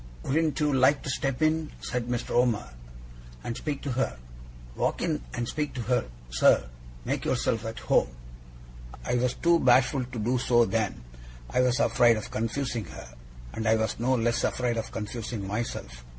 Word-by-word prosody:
'Wouldn't 155 +2 +1
you 150 -1 +2
like 135 +2 +4
to 135 - -2
step 135 +1 -1
in,' 155 0 +2
said 125 -2 -3
Mr. 120 -1 -3
Omer, 120 - +2 0.7
'and 115 - -3
speak 145 +1 -4
to 140 - -2
her? 120 - -1 0.6
Walk - - 0
in - - 0
and 120 - -2
speak 150 -1 -3
to 125 - -3
her, 125 +2 +1 0.3
sir! 60 0 +4 0.4
Make - - -1
yourself 115 0 0
at 115 - -6
home!' - - +2 1.0
I - - -1
was 125 0 +1
too 170 0 +3
bashful 130 0 +4
to 125 -1 -8
do 120 +4 +1
so 120 -1 +4
then 110 - -1 0.5
I - - +3
was 125 +1 +2
afraid 120 -4 +4
of 110 - -6
confusing 115 +1 -2
her, 65 -6 -11 0.4
and 110 0 -3
I 110 - +5
was 110 0 -1
no 130 +3 +2
less 120 0 +1
afraid 120 -2 0
of 115 - -4
confusing 110 -1 -4
myself. 95 - -4
120 Hz, 175 wpm, -27 LUFS, 110-130 Hz, 1.0 s, I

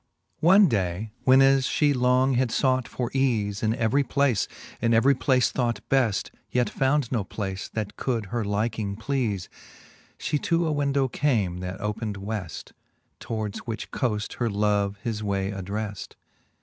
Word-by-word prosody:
VII. - - -1
One 195 +2 +7
day, 100 - -1
when 130 +1 +7
as 135 -1 +4
fhe 150 -2 +2
long 125 +1 +3
had 125 -1 +1
fought 130 -1 +1
for 125 -1 -4
eafe 110 -7 0
In 110 0 +1
every 125 +3 +2
place, 140 -6 +1 0.3
and 115 0 +3
every 130 +5 +5
place 130 -1 +2
thought 120 -4 -1
beft, 125 -7 +2 0.2
Yet 125 -1 0
found 135 -1 +1
no 115 -5 0
place 95 -1 -5
that 105 -1 -4
could 115 -5 -1
her 120 -2 0
liking 105 0 -1
pleale, 110 -5 -2 0.7
She 150 - -1
to 170 +3 +1
a 160 - 0
window 140 -2 +1
came, 110 -11 0
that 90 +1 -5
opened 105 0 -3
Weft, 100 -3 -6 0.5
Towards 110 -3 -4
which 115 -1 -5
coaft 105 -5 -2
her 120 -2 +1
love 100 -1 +1
his 110 -2 -2
way 100 -1 -1
addreft. 100 +1 -5
115 Hz, 160 wpm, -26 LUFS, 105-130 Hz, 0.7 s, One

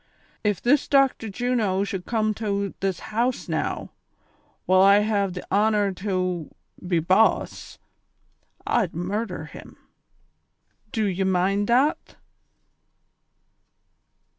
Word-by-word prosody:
Ef 205 -3 0
this 275 +4 +3
Doclitor 270 -6 +2
Juno 215 -4 0
should 190 -2 -5
com 215 -2 0
tow 200 -2 -2
tliis 195 -2 -1
liouse 235 +4 -2
now, - - -3 0.7
while 185 0 +4
I 200 +1 +6
have 200 -3 0
the 180 - -7
honor 205 -1 +2
tow 185 -4 -2 0.4
be 175 -1 +1
boss, 185 +7 +1 0.9
I'd 215 -8 0
murhder 185 0 -3
him. - - -13 1.1
Do 220 -5 0
ye 190 -1 -1
mind 190 +2 +1
that!' 260 +6 +1
200 Hz, 105 wpm, -24 LUFS, 185-220 Hz, 1.1 s, I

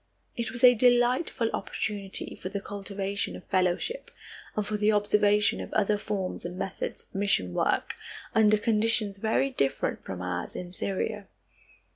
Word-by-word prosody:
It 235 -2 -2
was 245 -1 -5
a 250 0 +10
delightful 245 +1 +3
opportunity 200 -2 -3
for 185 - -6
the 200 +1 -3
cultivation 200 0 -4
of - - -10
fellowship, 185 - 0 0.5
and 210 - 0
for 210 +1 -2
the 210 +1 +3
observation 210 0 +3
of - - -7
other 210 0 +3
forms 200 -3 -3
and 175 +1 -6
methods 190 - -4
of - - -29
mission 195 - +1
work, - - +1 0.4
under 215 -1 +5
conditions 215 -2 +1
very 225 +6 +1
different 140 - -1
from 90 -1 -6
ours 90 -1 -3
in 180 -1 -6
Syria. 195 +2 -2
205 Hz, 150 wpm, -28 LUFS, 195-220 Hz, 0.5 s, a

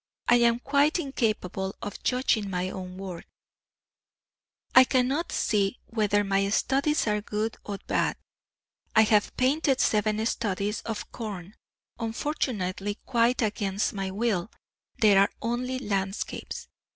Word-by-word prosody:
I 245 - +6
am 235 -1 +4
quite 285 +5 +2
incapable 215 - -2
of 205 - -6
judging 250 -5 +1
my 185 0 -2
own 185 -1 -7
work; 185 -3 -7 1.5
I 260 - +10
cannot 260 +6 +1
see 205 0 +1
whether 205 -3 +1
my 195 0 +1
studies 275 +7 +1
are 210 -1 +1
good 215 +2 -2
or 200 -1 -5
bad. - - 0 0.8
I 220 - +8
have 210 -1 +2
painted 270 +1 +2
seven 215 0 +2
studies 210 -2 -1
of 220 -2 -5
corn; 205 -4 -6 0.5
unfortunately, 220 -5 -2
quite 240 0 +2
against 205 -2 -1
my 195 -2 -3
will, 200 -2 -1 0.5
they 210 -3 +5
are 195 +1 +5
only 245 +3 -2
landscapes. 195 -4 -3
215 Hz, 125 wpm, -27 LUFS, 195-245 Hz, 1.5 s, I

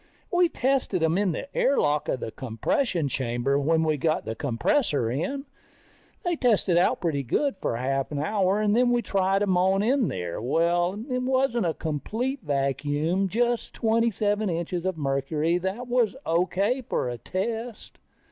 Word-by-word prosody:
We 355 -1 +4
tested 255 - 0
them 160 +1 +2
in 200 -3 +1
the 275 - -6
air 275 +1 +2
lock 145 0 +1
of 130 - -1
the - - -4
compression 140 - -1
chamber 130 +1 0
when 160 +3 +2
we 155 -1 +1
got 155 +2 0
the 110 - -3
compressor 140 - 0
in. 270 - -3 0.8
They 350 -1 0
tested 220 - +2
out 175 +2 +2
pretty 160 -6 0
good 270 - 0
for - - -2
a 120 - -4
half 135 +1 -1
hour, 195 +7 +1
then 240 +4 +3
we 240 -1 +2
tried 195 0 +1
them 190 -3 +2
on 190 +2 +3
in 250 0 +2
there. 90 0 -4
Well, 170 - +1
it 250 -2 -1
wasn't 255 -5 +1
a 160 - -1
complete 220 - -3
vacuum, 145 +5 0
just 240 +4 -1
twenty 230 +1 +2
seven 210 0 0
inches 170 +1 -3
of 185 -3 -1
mercury, 150 +4 0
but 190 +1 -1
that 245 +2 -8
was 245 -2 +1
O.K. 190 +9 +1
for - - 0
a 120 -1 -4
test. 225 +4 -5
185 Hz, 170 wpm, -26 LUFS, 145-235 Hz, 0.8 s, We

